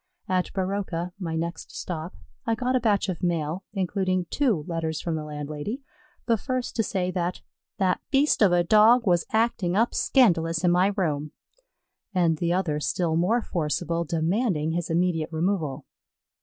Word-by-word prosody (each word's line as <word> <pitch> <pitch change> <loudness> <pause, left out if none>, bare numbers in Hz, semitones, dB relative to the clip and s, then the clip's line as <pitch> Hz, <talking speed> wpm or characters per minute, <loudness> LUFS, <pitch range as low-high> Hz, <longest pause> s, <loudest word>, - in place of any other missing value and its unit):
At 185 -1 0
Baroka, 185 -2 -2
my 165 -4 -3
next 165 0 -4
stop, 170 0 -5 0.3
I 225 - +2
got 255 +3 0
a - - +4
batch 215 -4 +1
of 180 -3 -3
mail 170 0 -1
including 185 -2 0
two 235 - +1
letters 160 -2 -2
from 170 - -3
the 155 -1 -3
landlady; 150 - -5 0.4
the 230 -2 +2
first 255 +2 -3
to - - +4
say 185 -4 -1
that 180 0 -2 0.3
"that 185 -2 +1
beast 285 -1 +3
of 200 -4 +6
a 175 0 +4
Dog 220 +6 +5
was 175 -3 +2
acting 220 -5 +1
up 230 +4 +2
scandalous 165 -10 +3
in 175 - +4
my 180 +2 +4
room," 150 -5 -1 0.8
and 165 -3 +2
the 170 0 0
other 170 -5 0
still 160 +1 0
more 210 +8 +2
forcible, 165 +1 -1
demanding 165 0 0
his 170 0 -2
immediate 165 -1 +1
removal. 160 -5 -1
180 Hz, 160 wpm, -26 LUFS, 165-205 Hz, 0.8 s, of